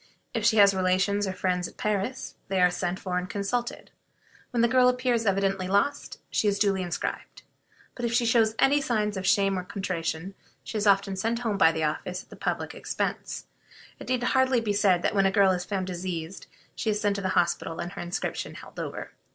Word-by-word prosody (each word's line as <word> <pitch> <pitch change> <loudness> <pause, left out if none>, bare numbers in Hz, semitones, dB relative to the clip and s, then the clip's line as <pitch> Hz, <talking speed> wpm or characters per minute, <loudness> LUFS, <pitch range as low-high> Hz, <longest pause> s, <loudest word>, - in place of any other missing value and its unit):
If 230 -3 -1
she 220 0 +4
has 200 -1 +7
relations 190 +2 +1
or 190 - -2
friends 180 -2 -1
at - - -16
Paris, 210 +5 -2
they 190 0 0
are 180 0 +5
sent 180 0 -2
for 180 -1 -2
and 180 +1 -6
consulted. 235 +5 -3 0.6
When 240 - 0
the - - +6
girl 250 +1 +5
appears 250 -3 0
evidently 195 -1 +1
lost, 200 +9 0
she 215 - +1
is 200 -1 +2
duly 195 -2 +2
inscribed; 175 -2 -4 0.5
but 245 - -8
if 235 - 0
she 235 +1 +2
shows 225 -2 +3
any 285 +2 +4
signs 210 -5 0
of 190 0 -3
shame 195 -1 +3
or - - -5
contrition, 185 -2 -3 0.3
she - - -8
is 210 -1 0
often 195 0 +3
sent 225 +5 -1
home 215 -4 -1
by 160 -4 +6
the 160 -1 -2
office 180 +4 -2
at - - -29
the - - -9
public - - -3
expense. - - -3 0.5
It - - -9
need 255 -1 0
hardly 260 0 +3
be 215 -3 -1
said 195 -4 +3
that - - +1
when 195 -1 +4
a - - +1
girl 195 -1 +5
is 180 -1 -2
found 195 -2 -2
diseased 180 -1 -5 0.3
she 225 - -2
is 210 -1 +1
sent 205 -1 +1
to 195 -1 -2
hospital 170 -2 0
and 175 +1 -4
her - - -7
inscription 175 +1 -4
held - - -11
over. - - -5
195 Hz, 210 wpm, -27 LUFS, 185-220 Hz, 0.6 s, has